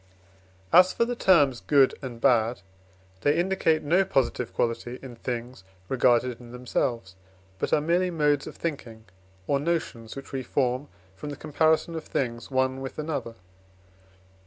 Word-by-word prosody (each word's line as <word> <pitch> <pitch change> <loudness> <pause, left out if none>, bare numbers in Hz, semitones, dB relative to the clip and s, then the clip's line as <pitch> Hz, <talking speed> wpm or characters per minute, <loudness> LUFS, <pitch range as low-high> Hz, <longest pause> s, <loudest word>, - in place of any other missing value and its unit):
As 185 +1 +7
for 235 - +2
the 245 +1 -3
terms 145 - +4
good 140 -3 +4
and 125 -3 -7
bad, 115 -2 +2 0.6
they 145 +2 +2
indicate 170 -3 +1
no 175 +6 +3
positive 130 -8 0
quality 120 +1 -2
in 125 -3 -9
things 120 -2 -5 0.3
regarded 125 -1 +2
in 120 -1 -12
themselves, 120 -4 -2 0.5
but - - -2
are 150 - +3
merely 175 +4 +1
modes 150 -4 +1
of - - -8
thinking, 115 -9 -5 0.4
or 140 +7 +1
notions 145 -8 -3
which 135 - -9
we 135 - -3
form 130 +2 -1 0.3
from 120 +10 -7
the 145 - -5
comparison 155 +3 +1
of 160 -1 -5
things 120 -3 -3
one 130 0 0
with 135 - -7
another. 150 -7 -4
135 Hz, 150 wpm, -26 LUFS, 120-155 Hz, 0.6 s, As